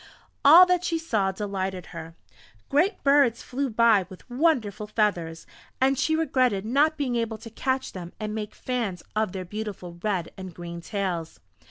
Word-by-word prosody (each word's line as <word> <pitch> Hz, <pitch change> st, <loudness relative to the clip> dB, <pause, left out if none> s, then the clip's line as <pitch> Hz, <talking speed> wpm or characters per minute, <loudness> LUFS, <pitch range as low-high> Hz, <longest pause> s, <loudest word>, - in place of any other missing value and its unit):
All 330 Hz, +6 st, +10 dB
that 360 Hz, -1 st, +1 dB
she 335 Hz, -2 st, 0 dB
saw 220 Hz, -12 st, 0 dB
delighted 190 Hz, -2 st, -4 dB
her. 165 Hz, +1 st, -8 dB, 0.5 s
Great 355 Hz, +8 st, +1 dB
birds 275 Hz, -4 st, +4 dB
flew 270 Hz, +2 st, -2 dB
by 220 Hz, -4 st, +4 dB
with 185 Hz, -, -13 dB
wonderful 240 Hz, -, +1 dB
feathers, 180 Hz, -7 st, -1 dB, 0.3 s
and 270 Hz, +1 st, +3 dB
she 315 Hz, +4 st, +1 dB
regretted 255 Hz, -10 st, +1 dB
not 295 Hz, +7 st, +2 dB
being 265 Hz, -4 st, -1 dB
able 230 Hz, -2 st, -1 dB
to 225 Hz, +1 st, -11 dB
catch 260 Hz, +3 st, -2 dB
them 175 Hz, -2 st, -8 dB
and 215 Hz, -1 st, -4 dB
make 215 Hz, -1 st, -5 dB
fans 230 Hz, -8 st, -3 dB
of 215 Hz, -3 st, +1 dB
their 185 Hz, -1 st, -5 dB
beautiful 190 Hz, -3 st, -6 dB
red 190 Hz, -5 st, -1 dB
and 185 Hz, -3 st, -9 dB
green 170 Hz, -1 st, -7 dB
tails. 180 Hz, -4 st, -3 dB
215 Hz, 165 wpm, -26 LUFS, 190-265 Hz, 0.5 s, All